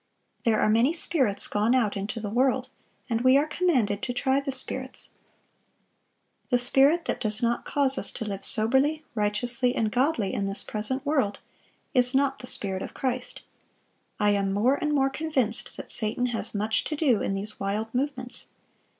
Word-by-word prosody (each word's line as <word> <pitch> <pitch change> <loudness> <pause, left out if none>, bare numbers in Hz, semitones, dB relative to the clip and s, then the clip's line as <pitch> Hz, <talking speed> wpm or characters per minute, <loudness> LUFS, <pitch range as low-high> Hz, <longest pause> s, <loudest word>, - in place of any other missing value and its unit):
'... - - -45
There 225 -2 +3
are - - +2
many 230 +8 +3
spirits 275 - +1
gone 215 +4 +1
out 225 -5 +1
into 205 +4 -4
the 210 -2 -5
world; 255 +2 +1 0.4
and 230 -2 -1
we 255 +2 +5
are 290 - +2
commanded 260 - 0
to 245 - -3
try 265 +2 +1
the 280 0 -4
spirits. 260 0 -1 1.4
The 245 - +3
spirit 275 +7 +4
that - - -3
does 215 +2 0
not 235 0 0
cause 275 -2 +2
us - - +6
to 225 - -5
live 200 -2 -5
soberly, 265 +8 +1
righteously, 235 +4 +1
and 220 -4 0
godly, 250 -5 0
in 200 - -2
this 195 +1 +2
present 255 +6 -1
world, 270 -9 0 0.6
is 250 -1 +2
not 270 0 +1
the 250 - -8
Spirit 190 -5 0
of - - -7
Christ. 255 -1 -3 0.8
I 210 0 +3
am 200 -1 0
more 215 +7 +2
and 300 +1 -1
more 270 -2 +2
convinced 270 -7 -2
that - - -9
Satan 220 +2 -1
has 225 - -4
much 215 +2 0
to 305 - -3
do 275 -8 +2
in 195 - -1
these 210 +2 -3
wild 210 +3 -3
movements.... 255 -1 -4
245 Hz, 180 wpm, -26 LUFS, 215-270 Hz, 1.4 s, us